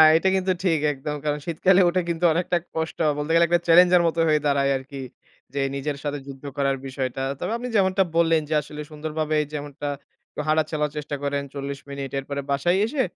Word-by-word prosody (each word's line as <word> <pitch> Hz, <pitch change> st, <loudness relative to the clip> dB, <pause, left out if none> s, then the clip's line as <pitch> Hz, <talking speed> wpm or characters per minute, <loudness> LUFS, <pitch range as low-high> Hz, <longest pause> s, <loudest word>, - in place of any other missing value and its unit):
এটা 180 Hz, +4 st, +3 dB
কিন্তু 190 Hz, 0 st, +1 dB
ঠিক, 165 Hz, -5 st, +2 dB
একদম। 150 Hz, +2 st, -5 dB
কারণ 150 Hz, 0 st, 0 dB
শীতকালে 180 Hz, +3 st, +3 dB
উঠে 180 Hz, +1 st, +1 dB
কিন্তু 170 Hz, +1 st, -2 dB
অনেকটা 175 Hz, +1 st, +1 dB, 0.2 s
কষ্ট। 160 Hz, 0 st, -2 dB, 0.2 s
বলতে 150 Hz, +2 st, -2 dB
গেলে 170 Hz, 0 st, +6 dB
একটা 175 Hz, +1 st, +3 dB
চ্যালেঞ্জের 180 Hz, +1 st, +7 dB
মতো 165 Hz, 0 st, -1 dB
হয়ে 155 Hz, -1 st, +4 dB
দাঁড়ায় 140 Hz, -1 st, +2 dB
আরকি। 135 Hz, +1 st, -8 dB, 0.5 s
যে 140 Hz, -, -1 dB
নিজের 140 Hz, +1 st, -3 dB
সাথে 145 Hz, 0 st, -2 dB
যুদ্ধ 135 Hz, 0 st, -10 dB
করার 135 Hz, -1 st, +1 dB
বিষয়টা। 130 Hz, -1 st, -3 dB, 0.2 s
তবে -, -, -3 dB
আপনি 250 Hz, +1 st, -5 dB
যেমনটা 190 Hz, -1 st, +3 dB
বললেন 165 Hz, -1 st, +4 dB
যে -, -, 0 dB
আসলে, 150 Hz, +1 st, -8 dB
সুন্দরভাবে 155 Hz, 0 st, -2 dB, 0.2 s
যেমনটা 145 Hz, 0 st, -5 dB, 0.6 s
হাটা 155 Hz, 0 st, +3 dB
চালার 150 Hz, -1 st, -1 dB
চেষ্টা 150 Hz, -1 st, -3 dB
করেন, 140 Hz, 0 st, 0 dB
৪০ 140 Hz, 0 st, -5 dB
মিনিট। 140 Hz, -1 st, -5 dB
এরপরে 140 Hz, +1 st, -4 dB
বাসায় 175 Hz, +7 st, +2 dB
এসে 260 Hz, +3 st, 0 dB
150 Hz, 185 wpm, -24 LUFS, 140-170 Hz, 0.6 s, চ্যালেঞ্জের